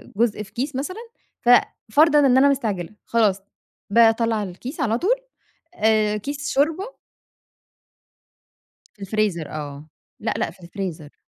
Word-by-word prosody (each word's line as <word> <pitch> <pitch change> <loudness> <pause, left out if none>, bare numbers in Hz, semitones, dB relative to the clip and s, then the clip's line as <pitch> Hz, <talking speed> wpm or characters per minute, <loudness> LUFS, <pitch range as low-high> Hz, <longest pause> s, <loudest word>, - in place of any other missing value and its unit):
جزء 215 -1 +1
في 195 - -16
كيس 265 +3 -3
مثلًا 295 +9 -4 0.4
ف 240 - 0 0.4
فرضًا 300 +4 +5
إن 265 -3 +5
أنا 280 +2 +6
مستعجلة، 210 -11 -1 0.2
خلاص 210 -4 +2 0.5
باطلّع 225 0 +3
الكيس 205 - -7
على 225 -3 +1
طول 400 - +2 0.6
آآ، 215 -5 +2
كيس 285 +7 -5
شوربة. 325 - 0 1.9
في 210 - -23
الفريزر 195 -6 -1
آه، 150 0 -7 0.3
لأ، - - -1
لأ - - -1
في 180 +1 -19
الفريزر. 170 -5 -6
220 Hz, 125 wpm, -22 LUFS, 195-275 Hz, 1.9 s, أنا